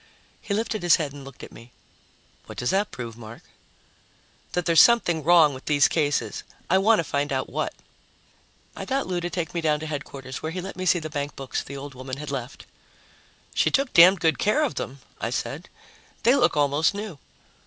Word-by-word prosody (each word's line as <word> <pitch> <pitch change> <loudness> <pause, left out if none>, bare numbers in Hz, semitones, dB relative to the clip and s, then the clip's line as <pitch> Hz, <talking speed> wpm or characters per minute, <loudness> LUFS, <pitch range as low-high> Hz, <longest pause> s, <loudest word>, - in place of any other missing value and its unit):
He 200 - -2
lifted 220 0 -2
his 175 -1 +5
head 150 -4 -3
and 145 -1 -10
looked 135 -2 -12
at - - -10
me. 115 +2 -14 0.8
"What - - -10
does 125 - -1
that 200 +2 +1
prove, 115 -3 -7
Mark?" 115 0 -11 1.1
"That 180 -1 -1
there's 165 -2 +6
something 200 -9 +4
wrong 165 -2 +5
with 130 - -10
these 145 -1 +4
cases. 145 -3 -1 0.3
I 190 - +5
want 215 +3 +4
to - - +1
find 145 0 -2
out 130 -1 -2
what." - - -2 1.0
I - - -6
got 270 0 -1
Lou 180 -1 -2
to 175 0 -3
take 175 -3 -4
me 170 - -2
down 150 -2 +1
to - - -5
Headquarters, 140 -3 -6
where 160 - -4
he 185 - -4
let 190 +1 -7
me 185 +1 -4
see 180 - +4
the 155 -2 -6
bankbooks 140 -2 -4
the 140 - -8
old 140 0 -8
woman 130 +1 -7
had 150 0 -6
left. 135 -1 -6 0.9
"She - - +2
took 275 -2 0
damned 180 +2 +7
good 160 -1 +2
care 250 +9 +2
of 290 - -1
them," 135 +1 -6 0.2
I - - -2
said. - - -4 0.5
"They 240 - +5
look 250 - +2
almost 145 +5 +2
new." 205 -7 -6
155 Hz, 205 wpm, -25 LUFS, 140-185 Hz, 1.1 s, damned